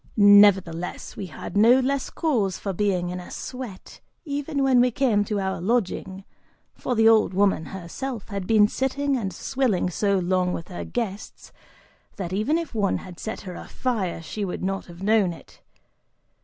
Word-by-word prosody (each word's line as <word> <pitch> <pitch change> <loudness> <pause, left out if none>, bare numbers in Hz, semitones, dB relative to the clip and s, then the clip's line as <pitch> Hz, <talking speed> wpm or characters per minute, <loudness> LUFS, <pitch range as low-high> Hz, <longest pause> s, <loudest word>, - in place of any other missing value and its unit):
Nevertheless, 200 -4 +4
we 200 -3 -5
had 170 - -8
no 230 +5 +6
less 270 +1 -1
cause 225 - 0
for 195 - -4
being 180 -2 0
in 180 - -4
a 180 - -10
sweat 250 -7 -8 0.2
even 285 -1 -2
when 260 -2 +5
we 250 - +4
came 240 -5 +2
to 205 0 -2
our 190 -2 -2
lodging, 195 -2 -1 0.5
for 250 - -3
the 225 0 +5
old 215 -5 +4
woman 195 -4 +2
herself 200 +6 -6
had 200 -3 -4
been 215 -2 +5
sitting 275 +4 -1
and 205 -7 -2
swilling 210 -2 -1
so 200 +2 +1
long 180 0 +1
with 165 - -6
her 180 - -5
guests 215 -4 -5 0.6
that 185 -3 -5
even 215 +11 +1
if 335 -4 -5
one 205 -3 +1
had 180 -2 -10
set 220 - -5
her 185 -3 -7
afire, 190 -5 -3
she 205 +6 -5
would 185 -2 -4
not 195 +1 -2
have 175 +1 -11
known 205 -4 +3
it. - - -16
205 Hz, 170 wpm, -24 LUFS, 185-245 Hz, 0.6 s, no